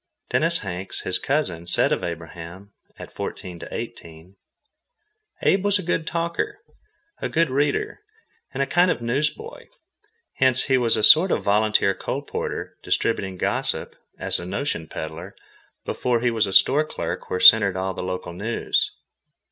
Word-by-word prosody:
Dennis 165 Hz, +1 st, +1 dB
Hanks, 95 Hz, -1 st, -5 dB
his 90 Hz, -, -2 dB
cousin, 90 Hz, -, -2 dB
said -, -, +3 dB
of -, -, 0 dB
Abraham, 85 Hz, +3 st, -7 dB, 0.3 s
at -, -, -10 dB
fourteen 90 Hz, -2 st, -6 dB
to -, -, -9 dB
eighteen: 85 Hz, +3 st, -8 dB, 1.1 s
"Abe 195 Hz, 0 st, +3 dB
was 205 Hz, 0 st, +4 dB
a 185 Hz, -, -5 dB
good 165 Hz, -1 st, -1 dB
talker, 170 Hz, -, -2 dB, 0.6 s
a -, -, -2 dB
good 165 Hz, -3 st, +1 dB
reader, 140 Hz, -, 0 dB, 0.5 s
and 140 Hz, -, -1 dB
a -, -, 0 dB
kind 175 Hz, +5 st, +3 dB
of 140 Hz, -, -1 dB
newsboy." 150 Hz, -, -2 dB, 0.7 s
Hence 130 Hz, -1 st, +3 dB
he 135 Hz, -2 st, +2 dB
was 115 Hz, -2 st, +2 dB
a 110 Hz, -, -1 dB
sort 165 Hz, -, +7 dB
of -, -, 0 dB
volunteer 105 Hz, -1 st, +3 dB
colporteur -, -, -5 dB
distributing 95 Hz, -5 st, -1 dB
gossip, -, -, -2 dB, 0.2 s
as -, -, 0 dB
a -, -, -7 dB
notion 95 Hz, -, -3 dB
pedler, 80 Hz, +5 st, -7 dB, 0.5 s
before 125 Hz, -2 st, 0 dB
he 120 Hz, 0 st, +2 dB
was 110 Hz, -2 st, +1 dB
a 95 Hz, -, -4 dB
store 145 Hz, +9 st, +5 dB
clerk 155 Hz, -, -5 dB
where 90 Hz, -, -1 dB
centered 100 Hz, -2 st, +7 dB
all 95 Hz, 0 st, -2 dB
the -, -, -6 dB
local 90 Hz, -1 st, -4 dB
news. 110 Hz, +6 st, -1 dB
110 Hz, 155 wpm, -23 LUFS, 90-150 Hz, 1.1 s, sort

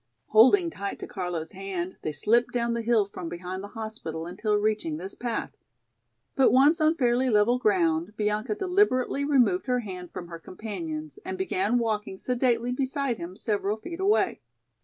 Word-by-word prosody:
Holding 330 Hz, -, +6 dB
tight 200 Hz, -9 st, -5 dB
to -, -, -7 dB
Carlo's 175 Hz, -4 st, -4 dB
hand, 190 Hz, -1 st, -5 dB
they 155 Hz, -, -2 dB
slipped 230 Hz, +11 st, +2 dB
down 235 Hz, -1 st, 0 dB
the 235 Hz, -, -1 dB
hill 225 Hz, -2 st, +3 dB
from 180 Hz, -4 st, -7 dB
behind 180 Hz, +2 st, -6 dB
the -, -, -6 dB
hospital 215 Hz, -8 st, -5 dB
until 210 Hz, +5 st, -1 dB
reaching 210 Hz, -7 st, 0 dB
this 190 Hz, +4 st, -7 dB
path. 240 Hz, -2 st, -3 dB, 0.8 s
But 270 Hz, -, +5 dB
once 290 Hz, +6 st, +5 dB
on 310 Hz, +1 st, +4 dB
fairly 250 Hz, -2 st, +2 dB
level 225 Hz, +3 st, +3 dB
ground, 180 Hz, -2 st, +1 dB
Bianca 210 Hz, +1 st, 0 dB
deliberately 360 Hz, -, +2 dB
removed 250 Hz, -9 st, +2 dB
her 250 Hz, -1 st, +1 dB
hand 180 Hz, -5 st, -7 dB
from 175 Hz, -, -7 dB
her 165 Hz, -1 st, -7 dB
companion's 310 Hz, -, -6 dB
and 375 Hz, 0 st, -5 dB
began 380 Hz, -7 st, 0 dB
walking 215 Hz, -4 st, -1 dB
sedately 245 Hz, 0 st, 0 dB
beside 265 Hz, -1 st, -1 dB
him 175 Hz, +2 st, -7 dB
several 210 Hz, 0 st, -1 dB
feet 340 Hz, +9 st, -8 dB
away. 400 Hz, +3 st, +2 dB
220 Hz, 165 wpm, -27 LUFS, 190-260 Hz, 0.8 s, Holding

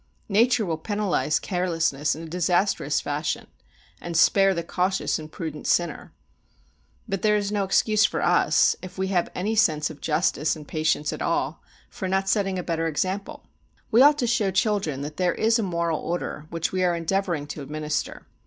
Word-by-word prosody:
Nature 225 Hz, +2 st, +3 dB
will 165 Hz, -3 st, -2 dB
penalise 205 Hz, -5 st, 0 dB
carelessness 165 Hz, -6 st, 0 dB
in 160 Hz, -, -8 dB
a -, -, -7 dB
disastrous 175 Hz, -2 st, +1 dB
fashion, 145 Hz, +2 st, -3 dB, 0.6 s
and 170 Hz, -1 st, -3 dB
spare 195 Hz, +3 st, +5 dB
the 170 Hz, -, -2 dB
cautious 185 Hz, +2 st, -1 dB
and 155 Hz, 0 st, -9 dB
prudent 155 Hz, -2 st, -6 dB
sinner. 175 Hz, -1 st, 0 dB, 1.0 s
But 195 Hz, -3 st, -3 dB
there 210 Hz, -1 st, +3 dB
is 205 Hz, -1 st, -1 dB
no 205 Hz, -1 st, 0 dB
excuse 215 Hz, +2 st, +3 dB
for -, -, +1 dB
us, -, -, +3 dB
if 185 Hz, 0 st, -10 dB
we 190 Hz, 0 st, -1 dB
have 180 Hz, -3 st, +1 dB
any 200 Hz, +5 st, -1 dB
sense 160 Hz, -8 st, +2 dB
of 150 Hz, -, -13 dB
justice 155 Hz, -1 st, +1 dB
and 150 Hz, -2 st, -11 dB
patience 155 Hz, -2 st, 0 dB
at -, -, -7 dB
all, -, -, -1 dB, 0.3 s
for 190 Hz, -, -5 dB
not 190 Hz, +1 st, 0 dB
setting 195 Hz, -2 st, +1 dB
a 180 Hz, -, -3 dB
better 165 Hz, -1 st, -1 dB
example. 185 Hz, +6 st, -3 dB, 0.5 s
We 235 Hz, +2 st, +6 dB
ought 290 Hz, +2 st, +7 dB
to 255 Hz, -, 0 dB
show 230 Hz, -4 st, +1 dB
children 190 Hz, -7 st, 0 dB
that 150 Hz, +1 st, -6 dB
there 180 Hz, -2 st, +1 dB
is 225 Hz, +1 st, +2 dB
a -, -, +1 dB
moral 170 Hz, -4 st, -1 dB
order 165 Hz, -3 st, -4 dB
which 165 Hz, 0 st, -2 dB
we 185 Hz, -1 st, 0 dB
are 175 Hz, -1 st, +2 dB
endeavouring 170 Hz, -2 st, -1 dB
to 150 Hz, -, -6 dB
administer. 150 Hz, +2 st, -4 dB
180 Hz, 180 wpm, -25 LUFS, 160-200 Hz, 1.0 s, ought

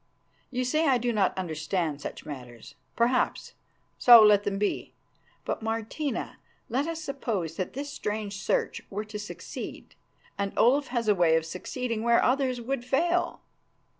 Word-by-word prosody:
You 255 Hz, -1 st, -2 dB
say 310 Hz, +5 st, +2 dB
I 265 Hz, -2 st, +4 dB
do 240 Hz, 0 st, -1 dB
not 200 Hz, -4 st, +1 dB
understand 160 Hz, -3 st, -2 dB
such -, -, -7 dB
matters. 125 Hz, -5 st, -9 dB, 0.2 s
Perhaps, 245 Hz, +2 st, +1 dB, 0.5 s
so 240 Hz, -2 st, +10 dB
let 205 Hz, -1 st, +5 dB
them 195 Hz, -1 st, -1 dB
be. 205 Hz, 0 st, -2 dB, 0.5 s
But, -, -, -2 dB
Martina, 225 Hz, +6 st, -3 dB, 0.3 s
let 265 Hz, +6 st, 0 dB
us 330 Hz, -1 st, -3 dB
suppose 215 Hz, -, -3 dB
that 185 Hz, -, -3 dB
this 280 Hz, +2 st, -5 dB
strange 210 Hz, -3 st, -4 dB
search -, -, 0 dB
were 210 Hz, +2 st, -4 dB
to 210 Hz, 0 st, -7 dB
succeed, 210 Hz, -, -8 dB, 0.5 s
and 200 Hz, 0 st, -1 dB
Olaf 275 Hz, +4 st, +4 dB
has 240 Hz, -2 st, -2 dB
a 210 Hz, -, +6 dB
way 170 Hz, -4 st, +4 dB
of 160 Hz, 0 st, +1 dB
succeeding 230 Hz, +7 st, -4 dB
where 235 Hz, 0 st, +4 dB
others 255 Hz, -1 st, +1 dB
would 245 Hz, +1 st, -3 dB
fail. 340 Hz, +8 st, 0 dB
225 Hz, 155 wpm, -28 LUFS, 195-255 Hz, 0.5 s, so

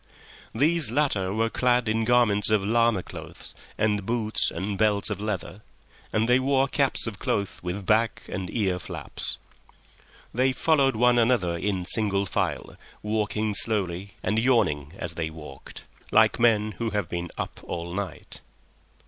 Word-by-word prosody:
These 155 Hz, +2 st, +3 dB
latter 120 Hz, -9 st, +1 dB
were 115 Hz, +2 st, 0 dB
clad 125 Hz, -1 st, +2 dB
in 110 Hz, +1 st, +1 dB
garments 115 Hz, -4 st, +3 dB
of 105 Hz, -2 st, +2 dB
llama 115 Hz, -3 st, +2 dB
cloth -, -, -9 dB, 0.2 s
and 105 Hz, -2 st, +1 dB
boots 110 Hz, 0 st, +1 dB
and 95 Hz, +4 st, -3 dB
belts 105 Hz, 0 st, +1 dB
of 100 Hz, -1 st, -3 dB
leather, 105 Hz, -1 st, -4 dB, 0.5 s
and 110 Hz, +1 st, +1 dB
they 125 Hz, +1 st, +4 dB
wore 135 Hz, 0 st, +2 dB
caps 140 Hz, -1 st, +1 dB
of 110 Hz, -3 st, -5 dB
cloth 100 Hz, -2 st, -2 dB
with 90 Hz, +2 st, -4 dB
back 110 Hz, +1 st, +2 dB
and 95 Hz, -2 st, -4 dB
ear 95 Hz, -6 st, 0 dB
flaps. -, -, -3 dB, 1.0 s
They 130 Hz, +2 st, +2 dB
followed 140 Hz, -3 st, +2 dB
one 120 Hz, +1 st, +4 dB
another 115 Hz, -8 st, +2 dB
in 95 Hz, 0 st, -2 dB
single 100 Hz, -1 st, +1 dB
file, 90 Hz, -, -2 dB, 0.3 s
walking 105 Hz, 0 st, -1 dB
slowly 100 Hz, -3 st, -1 dB
and 110 Hz, +1 st, +1 dB
yawning 95 Hz, -, +1 dB
as 85 Hz, -1 st, -4 dB
they 80 Hz, -1 st, -3 dB
walked, 75 Hz, -4 st, -11 dB, 0.3 s
like -, -, +4 dB
men 110 Hz, -2 st, +3 dB
who 115 Hz, -1 st, -1 dB
have 105 Hz, -4 st, -2 dB
been 85 Hz, 0 st, -4 dB
up -, -, -5 dB
all 85 Hz, 0 st, -5 dB
night. 100 Hz, 0 st, -6 dB
105 Hz, 150 wpm, -26 LUFS, 95-120 Hz, 1.0 s, they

